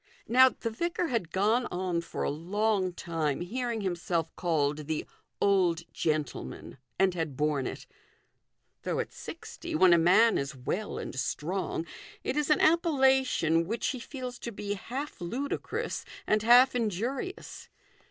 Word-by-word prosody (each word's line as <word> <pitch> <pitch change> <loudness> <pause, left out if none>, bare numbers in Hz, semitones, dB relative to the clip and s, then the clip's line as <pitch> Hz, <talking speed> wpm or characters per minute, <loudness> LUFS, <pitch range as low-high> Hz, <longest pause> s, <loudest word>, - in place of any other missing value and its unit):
Now, 260 +2 +7
the 230 -2 -5
vicar 340 +7 -1
had 225 -10 -1
gone 220 +6 +2
on 180 -1 -1
for 170 - -5
a - - 0
long 190 +4 0
time 165 -4 -2
hearing 235 +4 -2
himself 175 -3 -2
called 150 -4 0
the 160 -1 -2 0.2
" - - -51
old 180 -4 +3
gentleman," 145 - -3 0.2
and 190 -1 +3
had 160 -6 -3
borne 150 -3 +1
it; - - -7 1.0
though - - -2
at - - -3
sixty, - - -7
when 180 +2 +6
a 170 - +6
man 200 +8 +5
is 140 0 -4
well 180 +11 -3
and - - -5
strong, 165 +6 -2 0.4
it - - -1
is 300 -1 0
an 300 - +4
appellation 265 - +3
which 225 +3 -1
he 260 - -3
feels 250 0 -7
to 235 - -5
be 205 -1 -4
half 260 +7 -6
ludicrous 250 +12 -3 0.2
and 215 0 +2
half 245 +4 +7
injurious. 245 - -3
195 Hz, 150 wpm, -29 LUFS, 165-245 Hz, 1.0 s, Now